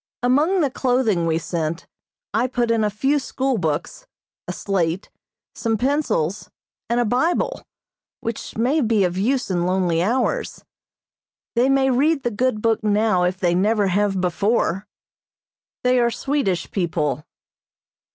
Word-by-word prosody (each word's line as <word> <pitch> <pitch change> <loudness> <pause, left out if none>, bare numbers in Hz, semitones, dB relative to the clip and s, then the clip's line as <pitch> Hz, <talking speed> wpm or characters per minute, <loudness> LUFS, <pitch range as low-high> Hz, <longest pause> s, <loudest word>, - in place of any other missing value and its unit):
Among 300 +10 +3
the 285 -4 +1
clothing 245 -10 +1
we 160 0 +1
sent 165 +1 -3 0.5
I 230 +4 +2
put 240 -2 0
in 225 -1 +2
a 210 - +2
few 270 +8 +1
school 265 -2 -1
books, 160 - -3 0.4
a - - -2
slate, 185 -2 -2 0.4
some 225 -2 -1
pencils, 250 - 0 0.4
and 235 +1 +1
a 240 - +2
Bible, 260 +10 0 0.6
which 230 -1 -5
may 260 +7 +2
be 225 -4 +2
of 180 -1 0
use 240 +4 0
in 175 -1 0
lonely 180 -3 +1
hours. 240 +7 -1 0.9
They 245 +3 +3
may 270 -1 +3
read 280 +3 +2
the 240 - 0
good 215 0 -1
book 225 -1 +2
now 210 -3 +2
if 180 +1 -1
they 175 -2 +2
never 205 +2 +2
have 195 +1 +1
before. 195 +1 0 1.0
They 250 0 +3
are 235 0 +3
Swedish 235 -9 -1
people. 155 -6 -1
220 Hz, 140 wpm, -22 LUFS, 185-255 Hz, 1.0 s, Among